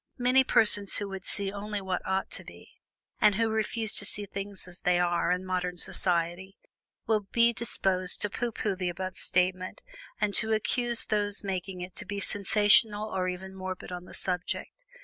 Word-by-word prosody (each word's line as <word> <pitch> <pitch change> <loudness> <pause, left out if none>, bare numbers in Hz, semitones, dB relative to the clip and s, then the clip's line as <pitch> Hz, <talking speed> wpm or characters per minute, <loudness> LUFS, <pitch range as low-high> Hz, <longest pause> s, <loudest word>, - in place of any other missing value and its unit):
Many 255 +1 +3
persons 210 -5 +3
who 205 - -3
would 195 -1 -8
see 200 -1 -4
only 205 +1 -5
what 190 -2 -3
"ought 190 0 -2
to - - -3
be," - - -14 0.5
and 210 -2 +4
who 225 +1 +1
refuse 220 0 -1
to - - +6
see 205 0 +4
"things 195 -1 -5
as 180 0 -10
they 180 -1 +1
are" 175 -1 +1
in 180 +1 -1
modern 180 -1 -3
society, 180 +1 +2 0.5
will 220 -1 +2
be 235 0 +3
disposed 190 -5 -1
to 210 - -1
pooh 240 +2 -3
pooh 210 -2 -2
the 180 -1 -3
above 185 +1 -5
statement, 185 0 -1 0.4
and 205 - 0
to 220 +1 +3
accuse 235 +2 +4
those 205 -1 0
making 185 -1 -5
it 180 0 -7
to - - -4
be 205 0 -4
sensational 210 +2 +3
or 185 -2 -2
even 185 +1 -6
morbid 185 -1 -7
on 180 0 -7
the - - -10
subject. 185 - -3
195 Hz, 185 wpm, -28 LUFS, 185-210 Hz, 0.5 s, to